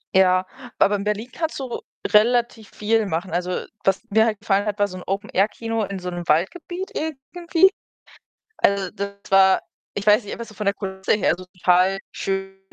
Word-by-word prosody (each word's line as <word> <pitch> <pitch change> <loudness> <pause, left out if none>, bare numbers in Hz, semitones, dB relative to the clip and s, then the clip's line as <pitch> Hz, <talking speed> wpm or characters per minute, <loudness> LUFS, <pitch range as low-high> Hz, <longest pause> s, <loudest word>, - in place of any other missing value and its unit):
Ja, 185 -1 +5 0.3
aber 205 - +4
in 200 - -5
Berlin 210 +4 -2
kannst 320 -1 -3
du 255 -3 -4 0.3
relativ 230 0 +2
viel 220 +1 +1
machen. 180 0 -3
Also, 180 +1 -2 0.2
was 195 +3 +2
mir 220 +2 +4
halt 220 -2 -1
gefallen 205 -1 +1
hat, 210 0 -2
war 205 - +3
so 185 - -8
'n 180 - -9
Open 195 +1 -3
Air 195 +2 +3
Kino 225 0 -3
in 195 -1 -4
so 180 0 -5
'nem 175 -1 -6
Waldgebiet 350 - -1
irgendwie. 330 +4 +1 0.9
Also, 195 -2 +1
das 200 0 -4 0.2
war 190 0 +6 0.3
ich 205 +1 -5
weiß 210 +2 +6
nicht, 200 - -8
einfach 235 - -6
so 215 - -14
von 210 0 -5
der 200 - +3
Kulisse 190 -1 -2
her, 210 - +2
also, 180 +2 -4
total 180 +1 +2
schön. 195 0 -3
200 Hz, 195 wpm, -22 LUFS, 190-225 Hz, 0.9 s, war